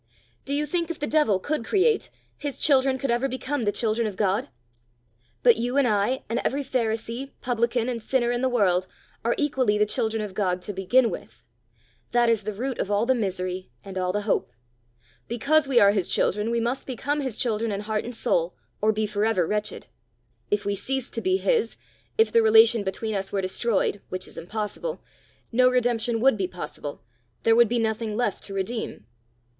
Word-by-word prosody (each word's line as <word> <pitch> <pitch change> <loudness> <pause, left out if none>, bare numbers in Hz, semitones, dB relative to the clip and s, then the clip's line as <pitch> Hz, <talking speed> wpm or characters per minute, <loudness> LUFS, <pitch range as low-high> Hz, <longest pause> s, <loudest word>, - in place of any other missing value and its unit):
Do 280 - -1
you 300 +1 +1
think 335 +2 -1
if 340 - -4
the 295 - -2
devil 295 -11 +3
could 295 +5 -2
create, 415 - +2 0.3
his 290 -2 -5
children 270 -2 +3
could 265 -1 -1
ever 240 +3 +1
become 260 -1 -3
the 205 - +2
children 225 +1 0
of 205 - -5
God? 210 +6 0 0.9
But 240 -3 +6
you 245 +3 -1
and 280 -3 +4
I, 215 +4 +1
and 230 +2 -1
every 280 +2 0
pharisee, 235 +1 -2
publican, 235 -1 0
and 240 -2 -3
sinner 240 +1 +1
in 240 0 -1
the 260 - +2
world, 185 -6 +2 0.4
are 235 - +1
equally 260 -8 +1
the 210 - +4
children 220 0 -1
of 205 -3 -6
God 185 -2 0
to 205 - -5
begin 220 +5 +3
with. 120 - -9 0.7
That 240 -1 +4
is 225 -2 +2
the 215 +1 -4
root 255 +4 -3
of - - -1
all 205 +2 +2
the 260 - +3
misery 185 - -3 0.2
and 195 -1 -8
all 185 -1 0
the 210 +2 -1
hope. 205 - 0 0.8
Because 275 +6 +2
we 260 -3 +4
are 200 0 +6
his 200 -4 0
children, 210 +3 +1
we 235 0 +1
must 240 +3 -2
become 285 +3 -2
his 260 -5 -3
children 225 -2 0
in 200 0 -2
heart 215 0 -2
and 240 0 -6
soul, 170 -5 0 0.3
or 215 +1 +4
be 215 0 -1
for 205 0 -1
ever 220 -6 +2
wretched. 210 +3 -2 0.6
If 205 0 0
we 200 - 0
ceased 265 +5 -3
to 230 - -2
be 375 0 +2
his, 460 +2 0 0.4
if 445 - +4
the 230 - +5
relation 225 0 +6
between 210 +3 -3
us 195 -1 -2
were 200 - 0
destroyed, 195 +1 0
which 185 0 -4
is - - -12
impossible, 215 - -4 0.5
no 255 +2 +5
redemption 240 -2 +1
would 265 -3 +4
be 190 - 0
possible, 150 -6 -7 0.4
there 225 0 +5
would 235 -2 +5
be 240 - +1
nothing 220 -1 -1
left 240 -5 -1
to 195 - -7
redeem." 195 - -4
230 Hz, 200 wpm, -25 LUFS, 205-255 Hz, 0.9 s, But